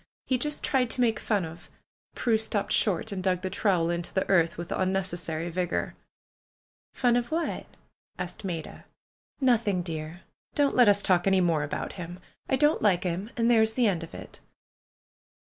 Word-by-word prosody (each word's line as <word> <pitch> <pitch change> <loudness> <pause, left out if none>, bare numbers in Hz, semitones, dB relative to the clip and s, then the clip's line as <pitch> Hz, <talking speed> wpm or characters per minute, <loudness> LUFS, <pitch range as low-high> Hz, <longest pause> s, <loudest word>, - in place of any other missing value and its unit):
He 255 -2 0
just 300 +3 -3
tried 255 -3 +1
to 250 - -1
make 225 -3 +2
fun 205 -5 0
of 160 +1 -11 0.2
" - - -47
Prue 225 -3 +1
stopped 215 -2 -1
short, 210 +2 +2
and 195 -2 -3
dug 185 -1 +1
the 185 - -3
trowel 180 -4 +1
into 170 0 -3
the 190 - -1
earth 170 -4 +3
with 170 0 -6
unnecessary 175 -3 -1
vigor. 180 0 -2 1.0
"Fun 245 -2 +2
of 240 0 0
what?" 330 +1 -2 0.5
asked 220 - -6
Maida. 170 -5 -6 0.5
"Nothing, 230 -8 +2
dear. 160 +1 -6 0.3
Don't 285 -1 +2
let 245 -4 +6
us 200 0 +4
talk 180 0 +3
any 190 -1 +4
more 170 -4 +2
about 145 - -4
him. 175 0 -8 0.3
I - - +3
don't 295 +4 +3
like 190 -5 +3
him, 185 +4 -3
and 230 0 +3
there 225 -2 +5
is 220 0 +2
the 245 +1 +2
end 185 -6 +1
of 165 - -9
it." - - -10
190 Hz, 180 wpm, -27 LUFS, 175-230 Hz, 1.0 s, let